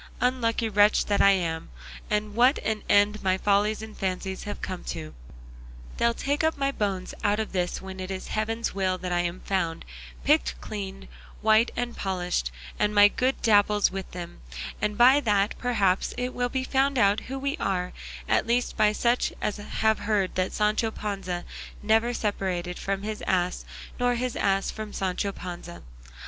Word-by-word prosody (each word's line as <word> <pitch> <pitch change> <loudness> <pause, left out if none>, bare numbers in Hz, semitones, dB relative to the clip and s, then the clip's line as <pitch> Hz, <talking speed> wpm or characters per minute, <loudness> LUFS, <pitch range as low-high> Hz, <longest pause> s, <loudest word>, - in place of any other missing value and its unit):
Unlucky 240 -2 +1
wretch 205 0 +4
that 205 -1 +2
I 200 - +7
am, 165 -4 -2 0.4
what 215 +6 +3
an 215 -1 -1
end 205 +1 +4
my 185 -1 +2
follies 205 +2 +1
and 220 -1 -9
fancies 190 0 -3
have 205 - -5
come 185 -1 -5
to! 75 0 -5 0.8
They'll 235 0 +2
take 285 +4 -1
up 320 -1 +1
my 275 0 +1
bones 195 -7 -2
out 205 +1 +2
of 220 - -2
this, 180 -1 -2
when 190 0 -7
it 185 0 -5
is 190 -1 -5
heaven's 225 +2 -1
will 185 -1 0
that 180 0 -5
I'm 175 +1 -1
found, 170 -4 -2 0.4
picked 60 0 +2
clean, 195 - -6 0.4
white 220 +2 +5
and 240 -1 -2
polished, 180 - -1 0.3
and 210 0 +1
my 205 0 +8
good 255 +5 -1
Dapple's 210 -2 +4
with 190 -1 -5
them, 175 - -8 0.4
and 210 0 -1
by 255 +4 +7
that, 210 -5 +2
perhaps, 200 -7 +1
it 250 +1 -2
will 245 0 -1
be 260 +1 -1
found 270 +1 +1
out 205 -2 +4
who 270 - -3
we 275 +1 -1
are, 180 -2 -1 0.3
at - - +2
least 240 +1 +1
by 215 -1 +3
such 240 +3 +1
as 210 - -2
have 220 +1 0
heard 205 -3 0
that 185 0 0
Sancho 215 +1 +1
Panza 195 -5 -4 0.4
never 225 +3 +3
separated 185 -6 -2
from 195 0 -2
his 215 0 -4
ass, 180 -1 0 0.3
nor 245 0 +2
his 250 0 -2
ass 195 0 +1
from 215 -1 -7
Sancho 195 +1 -1
Panza. 175 -2 -8
205 Hz, 170 wpm, -26 LUFS, 190-230 Hz, 0.8 s, my